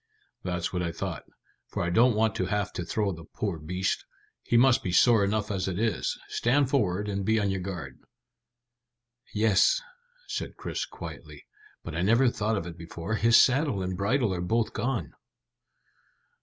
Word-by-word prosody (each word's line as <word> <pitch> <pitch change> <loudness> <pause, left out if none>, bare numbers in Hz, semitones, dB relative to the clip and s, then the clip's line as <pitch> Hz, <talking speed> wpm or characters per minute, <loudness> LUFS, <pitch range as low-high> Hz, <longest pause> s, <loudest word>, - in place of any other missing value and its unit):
"That's 90 -1 -3
what 90 - -1
I 85 -1 -1
thought, - - -5 0.4
for - - -3
I 85 - -1
don't 120 +4 +4
want 110 -1 +2
to 90 - 0
have 105 0 -1
to 90 - -3
throw 105 +3 -1
the 80 -2 -8
poor 100 -6 -2
beast; 90 +5 -2 0.4
he 120 - +1
must 125 0 +5
be 90 - -3
sore 115 +3 +5
enough 105 +1 0
as 95 -2 -1
it 90 -2 -2
is. 110 0 0
Stand 130 +3 +1
forward, 105 -6 +1
and 100 -1 -2
be 110 +3 +2
on 100 -2 0
your 95 -1 -2
guard." 85 -8 -6 1.3
"Yes," 110 - +3 0.5
said - - -5
Chris - - -3
quietly, - - -10 0.4
"but - - -6
I - - -1
never 115 +7 +4
thought 110 0 -1
of 85 - -3
it 85 -1 -8
before: 85 +4 -5
his 115 +2 +5
saddle 130 -6 +3
and 90 0 -3
bridle 105 +3 +1
are 90 - -3
both 110 +4 0
gone." 125 -1 -2
100 Hz, 175 wpm, -28 LUFS, 90-115 Hz, 1.3 s, must